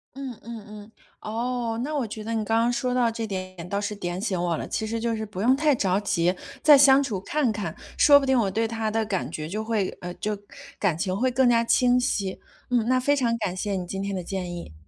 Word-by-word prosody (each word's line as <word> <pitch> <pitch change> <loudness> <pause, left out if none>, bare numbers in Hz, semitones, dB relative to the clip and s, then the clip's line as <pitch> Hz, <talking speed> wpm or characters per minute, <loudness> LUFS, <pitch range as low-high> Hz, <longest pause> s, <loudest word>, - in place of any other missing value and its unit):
嗯 265 -4 -6
嗯 230 -3 -8
嗯。 210 +1 -11 0.3
哦， 230 +1 -2
那 300 +3 -3
我 275 -4 0
觉 215 0 -7
得 225 +2 -3
你 220 -1 0
刚 225 +2 +1
刚 235 +1 +2
说 250 +1 -1
到 245 -2 +3
这 225 0 -4
点 185 -4 -6
倒 200 - -1
是 205 +1 -3
点 175 -2 -4
醒 190 -4 -1
我 170 -2 0
了， - - -5
其 220 - -2
实 230 +1 -2
就 230 0 -1
是 220 0 -4
不 200 -3 -8
用 250 +5 +4
太 300 +1 +3
着 195 -6 +1
急， 180 -3 +1 0.3
再 295 -2 +8
相 270 0 +7
处 230 -9 -2
看 290 +4 0
看， 200 -7 -4 0.2
说 285 -1 +7
不 275 - -2
定 265 -1 +3
我 205 -5 +1
对 225 +3 0
他 225 -1 -2
的 220 0 0
感 190 - -2
觉 155 -2 -5
就 210 +6 -3
会 220 -4 0
呃， 180 0 -5
就 210 0 -3 0.4
感 180 -6 +1
情 185 +2 -1
会 255 +5 +1
更 255 0 +3
加 230 -1 +4
清 245 +1 +3
晰。 200 -7 -1 0.3
嗯， 240 -3 +2
那 255 +1 +3
非 285 +3 +2
常 235 -4 +1
感 195 -5 -2
谢 200 +2 -2
你 185 -1 -3
今 190 +2 -4
天 200 0 -3
的 185 -2 -3
建 180 -1 -4
议。 170 - -8
220 Hz, 270 characters per minute, -25 LUFS, 195-245 Hz, 0.4 s, 再